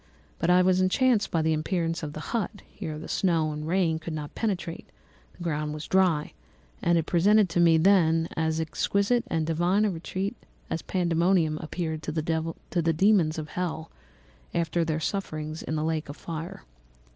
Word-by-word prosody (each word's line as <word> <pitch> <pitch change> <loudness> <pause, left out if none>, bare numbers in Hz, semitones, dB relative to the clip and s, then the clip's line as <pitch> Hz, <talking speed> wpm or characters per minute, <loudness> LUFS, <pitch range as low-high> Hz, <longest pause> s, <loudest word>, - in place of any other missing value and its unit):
But 165 - 0
I 180 +1 +6
was 185 0 +3
enchanted 220 +3 +3
by 165 -2 0
the 160 0 +2
appearance 165 +1 -1
of 150 -2 -5
the 155 - -6
hut; 215 -2 -2
here 155 -1 -6
the 155 - -8
snow 165 -4 +1
and 150 +1 -5
rain 165 -2 +1
could 160 0 -5
not 150 -1 -6
penetrate; 190 -6 -3 0.5
the 175 - -8
ground 150 -2 -2
was 150 - -6
dry; 180 -6 +2 0.5
and 170 0 +3
it 165 - 0
presented 200 +4 +4
to 170 - 0
me 165 -1 +6
then 165 -2 +4
as 160 0 0
exquisite 200 +8 +1
and 160 -7 0
divine 175 +6 +2
a 210 - +1
retreat 190 +5 -4 0.4
as 165 - -1
Pandæmonium 170 -3 +1
appeared 160 -1 -3
to 155 - -4
the 155 0 -2
dæmons 165 +2 +1
of 155 -1 -5
hell 165 -2 -4 0.6
after 170 0 +1
their 160 -1 -1
sufferings 155 -4 -3
in 155 - -3
the 155 - -1
lake 160 -2 -2
of 145 - -7
fire. 165 0 -6
165 Hz, 175 wpm, -27 LUFS, 155-185 Hz, 0.6 s, I